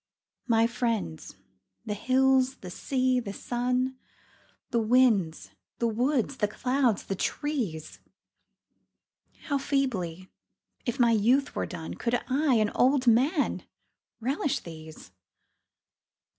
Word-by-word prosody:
My 230 -1 +4
friends 215 - -2 0.5
the 210 - -2
hills, 260 +3 +2
the 180 - -10
sea, 255 +4 0
the 205 -5 -5
sun, 250 +3 -1 0.7
The 235 - +2
winds, 215 - +2 0.3
the 235 - -1
woods, 250 +3 0
the 210 - +1
clouds, 250 0 0
the - - -3
trees 220 - -3 1.4
How 285 -2 -1
feebly, 190 - -2 0.6
if 245 +3 -2
my 235 -1 +5
youth 240 +6 +2
were - - -2
done, 165 -3 -6
Could 245 0 -1
I, 275 0 +2
an 215 -2 +2
old 260 +1 +3
man, 270 +7 +2 0.6
relish 270 +4 -1
these 160 - -11
240 Hz, 110 wpm, -28 LUFS, 205-260 Hz, 1.4 s, my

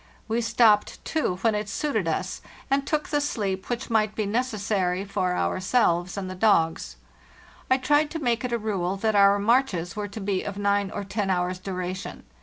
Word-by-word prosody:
We 230 +1 0
stopped, 225 -2 +3
too, 310 - 0
when 225 - +3
it 210 0 -2
suited 220 - -1
us, 180 +4 -2 0.3
and 275 0 +1
took 305 0 -1
the 295 -1 +1
sleep 200 -9 -2
which 240 0 -3
might 215 -1 +2
be 215 - -1
necessary 205 -5 -1
for 190 -2 -1
our - - 0
selves 185 -3 +1
and 195 -1 -3
the 185 - -5
dogs. 165 - +2 0.7
I 260 - +5
tried 290 +3 +2
to 330 - -4
make 245 -6 0
it 250 - -2
a 235 - +1
rule 195 -4 -2
that 220 +2 0
our 200 0 +6
marches 205 -6 +1
were 210 -1 -3
to 205 +2 -8
be 195 -2 -1
of 200 -1 -6
nine 200 -1 +1
or 205 - -5
ten 195 0 -2
hours' 180 0 0
duration. 185 -1 -5
205 Hz, 195 wpm, -25 LUFS, 185-235 Hz, 0.7 s, our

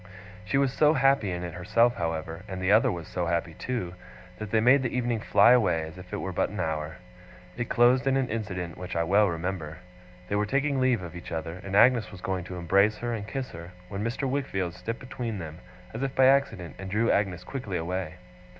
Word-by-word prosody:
She 135 - 0
was 135 -2 +2
so 150 +2 +4
happy 135 -8 +3
in 90 -1 -3
it 85 -2 -5
herself, 115 +7 +2
however, 80 -1 -3
and 95 -2 -5
the 95 +1 +1
other 110 +2 +5
was 85 -3 -6
so 90 -2 -2
happy 85 0 -1
too, 95 -4 -4 0.5
that 110 -1 -5
they 110 - +3
made 125 +5 +5
the 125 - -1
evening 120 -2 0
fly 115 - +5
away 95 -10 +3
as 80 0 -8
if 90 0 -12
it - - -2
were 95 - -4
but - - 0
an - - -7
hour. 80 0 -2 0.6
It 120 -1 -4
closed 125 +2 +4
in 135 0 +3
an 135 -2 +1
incident 95 -7 -4
which 90 0 -6
I 85 - +2
well 100 +5 +4
remember. 85 -2 -4 0.5
They 100 - -1
were 105 0 +1
taking 135 +2 +1
leave 125 -6 +2
of 85 0 -8
each 85 - -9
other, 80 +2 -4
and 100 0 -4
Agnes 120 +1 +5
was 95 - -10
going 90 -1 -3
to 90 - -7
embrace 100 +5 +3
her 120 +1 -3
and 105 -2 -5
kiss 135 +2 -4
her, 85 +2 -10 0.2
when 100 +1 -4
Mr. 120 +4 -2
Wickfield 110 -10 -2
stepped 115 +5 -5
between 120 -4 -5
them, 80 -2 -7 0.3
as 115 - -5
if 135 -1 -2
by 130 - +5
accident, 130 - +2
and 95 0 -6
drew 110 +4 +2
Agnes 95 -3 0
quickly 115 -9 -4
away. 90 0 -3
100 Hz, 225 wpm, -27 LUFS, 85-120 Hz, 0.6 s, other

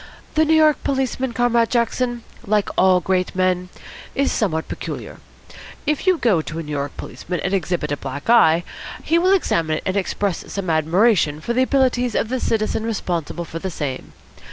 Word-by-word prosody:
The 315 0 +3
New 320 +1 +3
York 310 -1 +4
policeman, 265 -1 -1
Comrade 235 -1 +2
Jackson, 240 0 0 0.2
like 210 0 +1
all 185 -1 +4
great 185 -1 0
men, 185 -1 +1 0.5
is 275 0 +1
somewhat 160 -7 -1
peculiar. - - -6 0.7
If 300 +4 -1
you 370 -2 +5
go 210 - +2
to 155 - -7
a 165 - -3
New 150 - -8
York 140 -1 -3
policeman 180 0 -5
and 190 - -2
exhibit 175 -5 -1
a 145 - -1
black 145 +1 -7
eye, 175 -8 +5 0.4
he 335 +1 +2
will 365 +2 +3
examine 165 - +1
it - - -7
and 190 - -1
express 200 -1 -1
some 190 -4 -2
admiration 160 0 +2
for 235 +10 -3
the 255 - +2
abilities 255 -3 +1
of 225 - 0
the 260 +1 -1
citizen 220 -1 0
responsible 175 -6 -3
for 165 0 -6
the 190 - -4
same. 145 -6 -5
200 Hz, 180 wpm, -21 LUFS, 165-245 Hz, 0.7 s, you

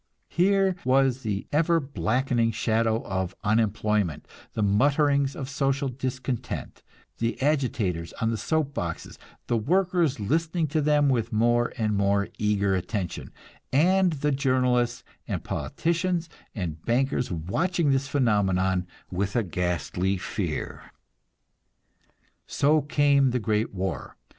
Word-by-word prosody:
Here 195 +1 +2
was 130 0 +2
the 105 -4 -3
ever 165 +3 +3
blackening 125 -4 0
shadow 115 0 +1
of 95 -1 -3
unemployment, 105 -4 0 0.3
the 110 - -1
mutterings 140 +6 +2
of 135 - -5
social 135 0 0
discontent, 130 -1 -4 0.4
the 115 -1 -1
agitators 120 - 0
on 115 0 -1
the 115 - -1
soap 150 +5 -1
boxes, 85 - -5 0.3
the 120 - 0
workers 170 - +1
listening 160 - 0
to 155 +2 +1
them 150 -1 +3
with 120 -4 +1
more 120 +2 +2
and 110 -2 0
more 100 0 +1
eager 100 -2 +1
attention, 95 0 -3 0.4
and 180 +5 +3
the 150 0 0
journalists 125 -3 +1 0.2
and - - -3
politicians 170 0 -1 0.3
and 85 -7 -4
bankers 125 +2 0
watching 145 - 0
this 135 0 +1
phenomenon 95 -8 +1 0.2
with 95 +2 -2
a 120 - +2
ghastly 90 +1 -1
fear. - - -4 1.6
So 150 +2 +3
came 140 -2 +3
the 125 0 0
great 110 0 0
war. 95 -2 -4
125 Hz, 120 wpm, -26 LUFS, 105-145 Hz, 1.6 s, ever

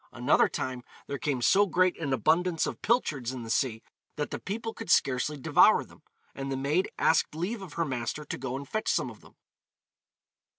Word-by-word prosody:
Another - - +3
time 130 -1 -4 0.2
there 140 - -5
came 135 -5 -1
so 200 +8 +5
great 185 +1 +2
an 150 -4 -2
abundance 165 +5 +2
of - - -5
pilchards 150 - 0
in 125 -2 -6
the 115 - -5
sea, 115 -4 0 0.3
that 150 -1 -3
the - - -4
people 225 +3 -4
could 225 - -8
scarcely 135 +3 +2
devour 130 - +5
them, - - -19 0.3
and 135 0 -5
the 135 - -1
maid 150 +7 0
asked 160 -1 +2
leave 195 +7 -3
of 185 -6 -9
her 170 - 0
master 130 +2 -3
to - - -5
go 130 -1 -4
and 140 +1 -6
fetch 215 +7 -3
some - - 0
of - - -15
them. - - -19
150 Hz, 200 wpm, -28 LUFS, 130-180 Hz, 0.3 s, so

